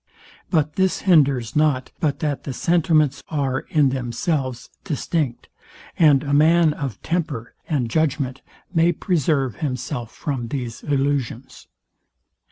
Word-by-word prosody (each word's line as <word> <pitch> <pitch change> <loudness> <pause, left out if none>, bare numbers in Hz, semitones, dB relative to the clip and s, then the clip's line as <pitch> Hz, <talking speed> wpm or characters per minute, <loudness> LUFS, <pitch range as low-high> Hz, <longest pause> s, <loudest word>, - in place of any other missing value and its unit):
But 155 -4 0
this 190 -2 +1
hinders 140 - +3
not, 150 -4 +1
but 150 -5 -1
that 145 -4 -1
the 135 - -5
sentiments 155 -2 +2
are, 135 -4 0
in 150 -4 +3
themselves, 130 +1 -2
distinct; 150 -3 -2 0.5
and 150 -4 +5
a 140 -1 -2
man 160 +2 +5
of 135 -9 -5
temper 155 -9 -2 0.2
and 140 -7 0
judgment 135 -1 -1 0.3
may 170 0 +4
preserve 145 - 0
himself 125 -3 -4
from 130 -5 -4
these 120 -3 -5
illusions. 135 -3 -2
145 Hz, 120 wpm, -22 LUFS, 130-155 Hz, 0.5 s, and